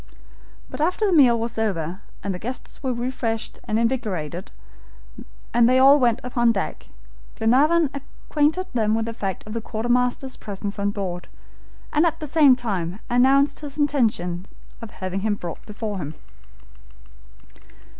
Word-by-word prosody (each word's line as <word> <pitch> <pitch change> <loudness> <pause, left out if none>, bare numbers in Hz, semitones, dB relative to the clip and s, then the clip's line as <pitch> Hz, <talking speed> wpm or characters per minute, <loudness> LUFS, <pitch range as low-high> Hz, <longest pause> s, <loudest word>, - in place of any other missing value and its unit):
But - - -7
after 360 +7 +1
the 390 - +2
meal 250 -7 +6
was 230 0 -3
over, 185 -4 -2 0.2
and 200 - -2
the 180 - -6
guests 250 +6 -6
were 265 -2 -1
refreshed 240 -2 -3
and 215 - 0
invigorated, 195 - -2 1.0
and 235 0 +5
they 255 - +4
all 275 +2 +7
went 240 -3 +3
upon 240 -2 +2
deck, 195 - -4 0.5
Glenarvan 290 +7 +3
acquainted 295 +4 -1
them 220 -3 +2
with 225 0 0
the 230 - -4
fact 195 -4 -4
of 215 - -7
the 230 - -2
quartermaster's 245 +4 -1
presence 200 0 -5
on 200 0 +1
board, 190 -4 -4 0.7
and 305 - +4
at 325 0 -2
the 310 - -4
same 290 -3 +5
time 195 -6 -3
announced 270 +3 +4
his 290 -2 -6
intention 215 - 0 0.3
of 230 - -7
having 185 -1 -4
him 210 +1 0
brought 175 -4 -7
before 210 -1 -4
them. 150 -1 -5
230 Hz, 150 wpm, -23 LUFS, 200-265 Hz, 1.0 s, all